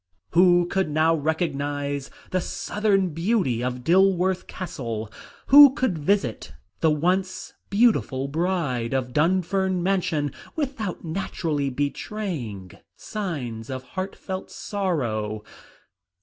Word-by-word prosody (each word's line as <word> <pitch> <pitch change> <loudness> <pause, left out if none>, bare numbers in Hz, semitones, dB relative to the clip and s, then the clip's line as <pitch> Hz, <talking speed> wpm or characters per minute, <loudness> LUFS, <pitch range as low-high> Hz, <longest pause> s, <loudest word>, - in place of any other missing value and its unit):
Who 175 0 +5
could 190 -1 0
now 155 +2 +3
recognise 145 -3 -2 0.2
the 185 - +1
"Southern 200 0 0
Beauty" 165 - 0
of 125 0 -3
Dilworth 185 +2 +3
Castle? 115 - -5 0.4
Who 280 0 +10
could 255 -9 0
visit 195 +7 0 0.3
the 160 - +3
once 180 +5 0 0.2
beautiful 200 - +2
bride 145 -7 -1
of 125 -2 -2
Dunfern 185 +3 +1
Mansion 180 -6 0 0.2
without 250 - -3
naturally 160 -4 -2
betraying 140 - -4 0.2
signs 135 - -5
of 130 -1 -5
heartfelt 190 0 -5
sorrow? 115 - -2
170 Hz, 100 wpm, -24 LUFS, 140-190 Hz, 0.4 s, Who